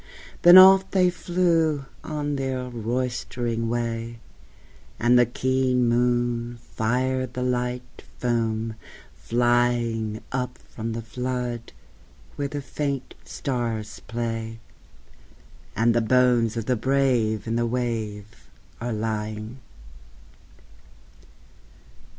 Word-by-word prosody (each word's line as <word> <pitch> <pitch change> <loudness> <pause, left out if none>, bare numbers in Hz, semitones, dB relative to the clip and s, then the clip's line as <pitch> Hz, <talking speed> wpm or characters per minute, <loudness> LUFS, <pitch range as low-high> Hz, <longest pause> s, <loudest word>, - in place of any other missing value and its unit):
Then 175 +1 +10
off 190 0 +8
they 185 -2 +3
flew 165 -5 +1 0.2
on 145 -2 -3
their 130 -2 -2
roystering 120 0 -2
way, 115 0 -3 0.8
And 120 +1 +5
the 120 - +4
keen 130 0 +1
moon 120 0 +1
fired 125 +3 -1
the 125 - -2
light 125 0 -3 0.2
foam 115 -2 -1 0.4
flying 120 -2 0
Up 125 -1 -3
from 115 0 -6
the 115 0 -5
flood 125 0 -4 0.6
where 145 - -2
the 145 0 -5
faint 140 -2 -3
stars 115 -5 -3
play, 115 -1 -4 1.2
And 115 +1 +3
the 120 - +2
bones 120 -1 +3
of 115 - -2
the 125 - +1
brave 120 -4 +1
in 115 0 -2
the 120 0 +1
wave 115 -3 -4 0.3
are 120 +1 -3
lying. 110 +2 -4
120 Hz, 100 wpm, -25 LUFS, 115-130 Hz, 1.2 s, Then